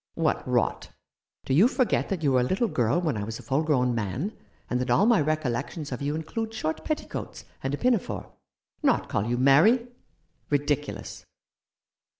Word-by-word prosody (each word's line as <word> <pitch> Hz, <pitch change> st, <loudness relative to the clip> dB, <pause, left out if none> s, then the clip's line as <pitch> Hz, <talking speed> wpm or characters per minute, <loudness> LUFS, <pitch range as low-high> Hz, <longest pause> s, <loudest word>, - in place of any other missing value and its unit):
" -, -, -66 dB
What -, -, +1 dB
rot! -, -, 0 dB, 0.6 s
Do 130 Hz, -, 0 dB
you 185 Hz, -, +6 dB
forget 255 Hz, -1 st, +1 dB
that 185 Hz, -5 st, -2 dB
you 140 Hz, -, +3 dB
were 130 Hz, -, +4 dB
a -, -, +2 dB
little 190 Hz, -, +1 dB
girl 125 Hz, -, +1 dB
when 155 Hz, -9 st, -1 dB
I 105 Hz, -, -2 dB
was 110 Hz, +1 st, -5 dB
a -, -, -12 dB
full 140 Hz, +2 st, +1 dB
grown 130 Hz, -6 st, +2 dB
man, 115 Hz, -, -3 dB, 0.3 s
and 125 Hz, 0 st, -1 dB
that 125 Hz, -, -3 dB
all 200 Hz, -, +4 dB
my 230 Hz, -6 st, +5 dB
recollections 150 Hz, 0 st, -2 dB
of 125 Hz, -, -4 dB
you 145 Hz, +2 st, -1 dB
include 225 Hz, +8 st, -4 dB
short 160 Hz, -7 st, -3 dB
petticoats 310 Hz, -, -4 dB, 0.2 s
and 135 Hz, -, -2 dB
a -, -, -9 dB
pinafore? 245 Hz, -1 st, -1 dB, 0.5 s
Not -, -, +2 dB
call 100 Hz, +2 st, 0 dB
you 120 Hz, +1 st, 0 dB
Mary? 170 Hz, -, +5 dB, 0.6 s
Ridiculous 145 Hz, 0 st, -2 dB
145 Hz, 180 wpm, -26 LUFS, 125-195 Hz, 0.6 s, you